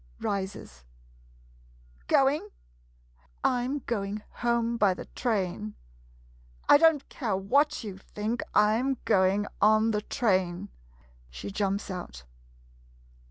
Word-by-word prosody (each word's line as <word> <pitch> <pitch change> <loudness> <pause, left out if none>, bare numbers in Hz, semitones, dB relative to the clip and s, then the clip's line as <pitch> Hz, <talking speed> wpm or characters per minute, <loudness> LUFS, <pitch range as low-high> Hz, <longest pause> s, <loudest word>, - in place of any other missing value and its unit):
[Rises.] 190 - -4 1.2
Going? 270 -4 +3 0.9
I 245 -1 +2
'm 270 +1 -3
going 205 -2 -3 0.2
home 235 -1 +1
by 205 -5 +3
the - - -8
train. 185 - -2 0.9
I 290 - +8
don't 320 -3 +4
care 220 -8 -2
what 265 +10 +2
you 195 -3 -7
think, 215 +4 -3
I 210 +1 +5
'm 265 +2 0
going 190 +2 +3 0.2
on 215 +1 +5
the 210 -1 0
train. 185 - 0 0.6
[She - - -7
jumps 200 0 -1
out. 175 - -7
210 Hz, 110 wpm, -28 LUFS, 190-240 Hz, 1.2 s, I